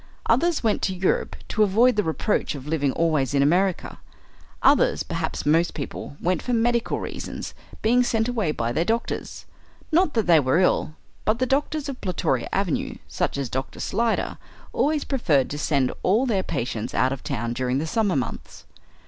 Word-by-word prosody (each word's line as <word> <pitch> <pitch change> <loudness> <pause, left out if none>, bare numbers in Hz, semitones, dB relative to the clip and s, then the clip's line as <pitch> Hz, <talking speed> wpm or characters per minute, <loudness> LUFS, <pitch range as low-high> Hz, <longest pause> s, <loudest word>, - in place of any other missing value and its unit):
Others 340 -4 +2
went 220 -2 +1
to 190 - -1
Europe 185 +1 0
to 215 - 0
avoid 220 +5 +4
the 210 - +2
reproach 160 0 -1
of 135 -2 -8
living 145 -3 +1
always 150 -5 +1
in 140 - +4
America. 180 +5 +1 0.6
Others, - - +4
perhaps - - -3
most 165 +3 +2
people, 140 -1 -6
went 180 +1 0
for 250 - -2
medical 235 0 +1
reasons, - - -6 0.3
being 240 +3 +4
sent 225 -2 +1
away 225 -10 0
by 115 -5 -2
their 155 +7 +1
doctors. 230 +5 -3 0.5
Not 320 -2 +3
that 225 -3 +2
they 170 -2 +6
were 130 +1 +2
ill; 180 -4 +2 0.3
but 215 +1 +1
the 255 - +1
doctors 290 +2 0
of 275 -3 -6
Plutoria 165 -9 -1
Avenue, 195 -5 -1
such - - -2
as 140 -2 -2
Doctor 130 +3 -4
Slyder, 230 0 -1 0.3
always 300 0 +1
preferred 160 - +1
to 145 - -4
send 140 -4 +1
all 215 +8 +3
their 210 -7 +1
patients 115 -9 -3
out 130 +1 +2
of 135 - -8
town 120 +2 -2
during 125 +1 -1
the 150 - -1
summer 205 +2 +1
months. 125 -4 -5
180 Hz, 175 wpm, -24 LUFS, 140-230 Hz, 0.6 s, they